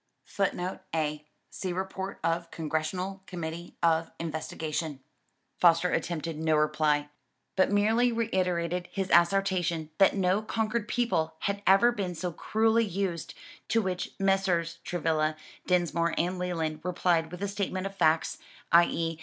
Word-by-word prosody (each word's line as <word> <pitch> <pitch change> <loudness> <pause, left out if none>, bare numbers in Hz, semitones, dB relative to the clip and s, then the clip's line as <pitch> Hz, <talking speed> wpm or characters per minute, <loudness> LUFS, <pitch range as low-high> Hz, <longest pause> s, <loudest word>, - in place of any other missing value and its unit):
[Footnote 190 -2 -2 0.2
A: 150 -1 -2 0.2
See 185 - -4
report 190 +1 -4
of 165 +1 0
Congressional 165 +5 -3
Committee 170 -1 -6
of 165 -1 +3
Investigation] 160 -2 -4 0.6
Foster 170 0 +5
attempted 165 -2 -2
no 160 -1 +2
reply, 150 -1 +2 0.5
but 190 +1 +3
merely 220 +4 +3
reiterated 180 -6 0
his 195 -2 -3
assertion 175 -3 +2
that 195 - +5
no 190 +1 +2
conquered 220 0 -1
people 165 -11 0
had 200 0 -1
ever 195 +6 +6
been 195 -6 -3
so 175 +2 -3
cruelly 225 +5 +2
used; 190 -4 -3 0.3
to 230 - +2
which 185 -4 -3
Messrs. 195 -4 +1
Travilla, 155 -2 0 0.3
Dinsmore 170 -2 +1
and 180 +2 0
Leland 165 -4 -2
replied 170 -1 +1
with 180 +2 -6
a - - 0
statement 195 -1 -2
of 195 - -4
facts, 160 -3 +2 0.3
i.e. 165 -1 +3
180 Hz, 130 wpm, -29 LUFS, 165-195 Hz, 0.6 s, ever